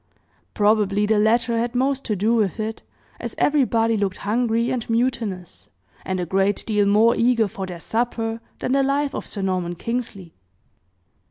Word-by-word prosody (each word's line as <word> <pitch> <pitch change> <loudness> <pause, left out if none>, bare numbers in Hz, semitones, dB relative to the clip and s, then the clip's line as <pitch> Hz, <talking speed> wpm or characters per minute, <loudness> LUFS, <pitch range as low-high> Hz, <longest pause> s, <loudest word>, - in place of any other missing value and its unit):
Probably 210 -1 +2
the 215 0 +2
latter 230 +2 +2
had 240 +1 -2
most 270 +2 +1
to 215 - -1
do 210 +4 +1
with 220 -2 +1
it, 220 +1 -3 0.4
as - - -6
everybody 230 -6 +2
looked 195 -2 -1
hungry 230 +2 +1
and 240 -3 -3
mutinous, 210 - -2 0.3
and 185 -1 -2
a 180 - -1
great 195 +3 +1
deal 210 -2 +2
more 220 +4 +4
eager 230 -2 +3
for 190 0 -6
their 175 -2 -7
supper 225 +2 -2 0.2
than 255 - -3
the 275 +1 +3
life 275 +1 0
of - - -5
Sir 200 - -3
Norman 180 -2 -1
Kingsley. 215 -4 -5
225 Hz, 165 wpm, -22 LUFS, 200-235 Hz, 0.4 s, more